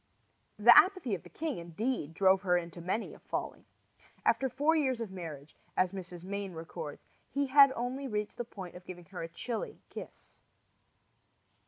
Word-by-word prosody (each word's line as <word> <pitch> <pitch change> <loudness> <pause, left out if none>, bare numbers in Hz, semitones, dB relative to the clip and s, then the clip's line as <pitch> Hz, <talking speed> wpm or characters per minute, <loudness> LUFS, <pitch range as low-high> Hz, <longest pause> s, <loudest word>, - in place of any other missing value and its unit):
The 235 +3 +8
apathy 370 - +5
of 180 - -2
the - - -14
king, 310 - -3
indeed, 170 - -3
drove 190 0 +5
her 180 -3 +3
into 170 0 -5
many 190 +6 -2
a - - -13
folly. - - -5 0.6
After 265 - +3
four 290 +6 +2
years 265 -6 +1
of 225 -4 -4
marriage, 155 -6 -8 0.2
as 185 -1 +3
Mrs. 180 -3 -7
Mayne 200 0 -4
records, 160 -2 -7 0.2
he 280 0 0
had 275 0 +8
only 255 +3 -3
reached 210 -3 -3
the 240 - -2
point 190 -6 -9
of 180 - -10
giving 175 -1 -8
her 185 +1 -7
a 165 - -3
chilly 220 +7 -4
kiss. - - -10
195 Hz, 170 wpm, -32 LUFS, 175-255 Hz, 0.6 s, The